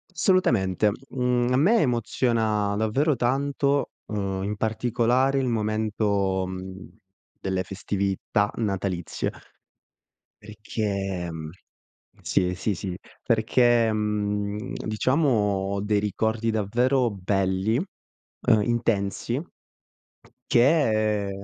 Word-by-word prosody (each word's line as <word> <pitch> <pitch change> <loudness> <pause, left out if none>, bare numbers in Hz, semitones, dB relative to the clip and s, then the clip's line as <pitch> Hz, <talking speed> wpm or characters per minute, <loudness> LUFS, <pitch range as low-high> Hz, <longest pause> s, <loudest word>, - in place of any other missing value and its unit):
Assolutamente, 110 - +2 0.2
mhmmm, 125 -1 +1
a 125 - +3
me 205 - +4
emoziona 115 -4 +1
davvero 130 +8 +1
tanto, 140 +3 0 0.2
uhm, 100 -3 -3
in 105 +1 -2
particolare 120 +5 +1
il 130 - 0
momento, 105 -4 0
mhmm, 95 0 -7 0.5
delle 95 -1 -1
festività 100 +2 -1
natalizie, 95 -6 -2 1.1
perché, 100 -3 -3
mhmm 80 -1 -6 0.7
sì, 90 -1 +1
sì, 100 +3 -1
sì, 90 +1 -5 0.3
perché, 115 0 +3
mhmm, 105 +2 -2
diciamo 130 +8 +1
ho 100 -4 0
dei 105 0 +1
ricordi 110 +2 -1
davvero 120 +4 +1
belli, 95 +2 0 0.5
uhm, 110 -2 +1
intensi, 115 +1 -1 1.1
che 110 -7 +3
110 Hz, 90 wpm, -25 LUFS, 100-120 Hz, 1.1 s, me